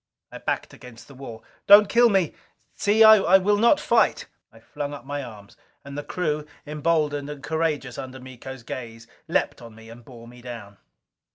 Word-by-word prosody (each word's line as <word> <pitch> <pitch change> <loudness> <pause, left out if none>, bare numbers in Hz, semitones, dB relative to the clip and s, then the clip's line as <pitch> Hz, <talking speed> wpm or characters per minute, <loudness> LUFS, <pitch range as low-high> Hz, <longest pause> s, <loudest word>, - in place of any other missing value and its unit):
I - - -9
backed - - -3
against 120 -2 -14
the 140 - -14
wall. 125 -4 -10 0.2
"Don't 205 +1 +8
kill 235 +2 +4
me! 190 -6 +1 0.4
See, 210 +2 +3
I 200 -4 +7
will 205 +2 +1
not 235 +7 +4
fight!" - - +1 0.3
I - - -18
flung 145 0 -6
up 135 - -12
my 145 +1 -4
arms. 105 -5 -12 0.3
And 140 0 -9
the 145 - -4
crew, 150 -4 -3 0.2
emboldened 150 -1 -1
and 145 -2 -9
courageous 150 -4 -2
under 130 0 -8
Miko's 130 0 -10
gaze, 115 -2 -8 0.2
leaped - - -1
on 115 -2 -12
me 110 0 -14
and 120 +1 -13
bore 115 -1 -14
me 120 +1 -14
down. 115 -5 -10
140 Hz, 180 wpm, -24 LUFS, 120-165 Hz, 0.4 s, Don't